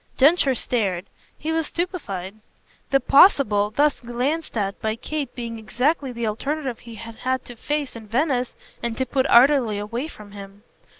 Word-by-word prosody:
Densher 280 -1 +4
stared 200 -7 -1 0.3
he 315 - -3
was 320 -2 0
stupefied; 215 - -4 0.5
the 275 - +4
"possible" 255 - +5
thus 290 +6 +2
glanced 250 +5 -2
at 200 -1 -2
by 220 0 -1
Kate 280 +3 -5
being 230 -2 -5
exactly 260 +6 0
the 235 -1 -3
alternative 265 +4 -2
he 235 -1 -11
had 225 +1 -9
had 260 0 -2
to 245 - -10
face 290 +3 -3
in 225 -2 -9
Venice 250 +1 0 0.3
and 235 -1 -3
to 260 - 0
put 265 0 0
utterly 245 -4 +5
away 230 +7 -3
from 210 -9 -13
him. 200 0 -11
245 Hz, 165 wpm, -23 LUFS, 215-285 Hz, 0.5 s, possible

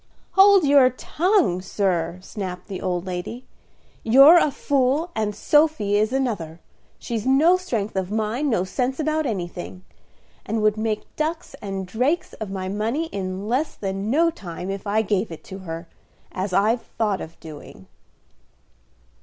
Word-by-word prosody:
"Hold 390 -1 +6
your 280 -2 +6
tongue, 315 - +1
sir," 180 -3 -1
snapped 185 -4 -6
the 195 -3 -6
old 180 -1 -2
lady. 185 +7 -5 0.6
"You're 275 +9 +8
a 305 - +2
fool 280 +4 0
and 210 -2 -1
Sophy 295 -10 +2
is 215 +2 +2
another. 205 -12 -2 0.4
She's 230 0 -4
no 300 +7 +5
strength 230 - -3
of 190 -1 -1
mind, 220 +7 -1
no 200 -7 +1
sense 250 +8 -2
about 310 -1 0
anything; 180 -3 -5 0.6
and 220 0 -2
would 215 -1 +3
make 215 -1 -3
ducks 320 +1 -3
and 195 -2 -4
drakes 255 - -1
of 215 - -4
my 190 -1 -4
money 225 +11 -2
in 190 +1 -4
less 260 +7 -1
than 195 +1 -4
no 330 +6 +3
time 180 - -7
if 195 +1 -6
I 215 +2 +2
gave 205 -2 -1
it 165 - -9
to 195 -3 -9
her, 165 -2 -7 0.4
as 190 +1 -3
I've 215 +5 +2
thought 210 -3 -2
of 165 +1 -10
doing." 150 -11 -11
215 Hz, 155 wpm, -23 LUFS, 190-275 Hz, 0.6 s, You're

